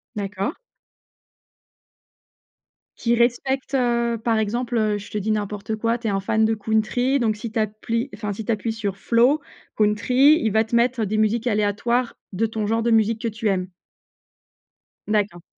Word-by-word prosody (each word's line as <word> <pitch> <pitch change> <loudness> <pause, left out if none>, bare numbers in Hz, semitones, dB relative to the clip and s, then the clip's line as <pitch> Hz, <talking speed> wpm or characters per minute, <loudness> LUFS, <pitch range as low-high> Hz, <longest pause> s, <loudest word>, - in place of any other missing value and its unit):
D'accord. 200 - -3 2.4
Qui 235 0 +1
respecte, 260 +3 0
heu, 235 -2 +1
par 230 -2 +2
exemple, 235 +3 -1
heu, 215 -1 +1
je 200 - -11
te 210 - -4
dis 210 +2 -1
n'importe 210 0 -2
quoi, 230 +2 0
tu 230 -2 -5
es - - +1
un 195 - 0
fan 220 +3 +1
de 225 - +2
country 220 +5 +1
donc 220 -3 +1
si 215 +1 -6
tu - - -5
appli 225 +4 -2
enfin 210 -2 -4
si 215 +1 -7
tu - - 0
appuies 225 +1 -1
sur 205 -3 -3
flow, 245 +8 +3 0.3
country, 250 +9 +4
il 220 - +1
va 220 +1 +3
te 225 - -3
mettre 235 -1 +2
des 215 +2 -1
musiques 220 +3 +1
aléatoires 230 +3 0 0.2
de 220 +5 +1
ton 215 -1 -3
genre 225 +1 +1
de 235 - +1
musique 220 0 +2
que 230 - -1
tu 215 -1 -2
aimes? 185 -1 0 1.4
D'accord. 200 -5 0
220 Hz, 175 wpm, -23 LUFS, 210-235 Hz, 2.4 s, country